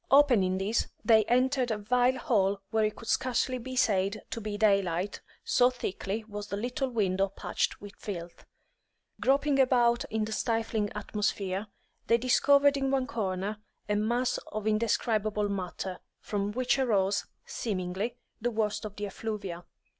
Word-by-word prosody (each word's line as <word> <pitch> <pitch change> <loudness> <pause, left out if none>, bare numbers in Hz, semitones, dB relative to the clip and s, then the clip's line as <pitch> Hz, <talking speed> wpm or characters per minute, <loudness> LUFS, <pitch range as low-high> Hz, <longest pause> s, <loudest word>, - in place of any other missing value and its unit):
Opening 245 -10 +5
this, 205 +4 0 0.2
they 220 -2 +6
entered 255 +1 +2
a 220 - 0
vile 245 +5 +2
hole 200 -4 +1
where 220 -1 +2
it 215 0 0
could 230 - -11
scarcely 255 0 +1
be 260 +2 -6
said 200 -3 +1
to 230 - -3
be 210 -1 -4
daylight, 195 -3 +1 0.2
so 245 0 +4
thickly 215 -3 -4
was 205 -1 -7
the 200 - -3
little 250 +5 -2
window 195 -5 +1
patched 195 - -2
with 205 0 -10
filth. 175 -4 -7 0.8
Groping 275 +1 +2
about 240 -2 +4
in 220 0 -1
the 220 - -6
stifling 225 -2 -1
atmosphere, 205 -1 -2 0.4
they 230 - +5
discovered 280 +3 +4
in 270 -1 0
one 265 -1 +1
corner 205 -5 -2 0.3
a 210 - +1
mass 235 +4 +1
of 215 -1 -4
indescribable 215 -1 +1
matter, 185 -1 -4 0.2
from 205 -1 -2
which 255 +4 +1
arose, 200 -6 +1 0.2
seemingly, 200 +2 -3 0.2
the 240 - +1
worst 215 -1 -1
of 205 -1 -7
the 205 - -4
effluvia. 195 -4 -5
215 Hz, 150 wpm, -29 LUFS, 200-245 Hz, 0.8 s, they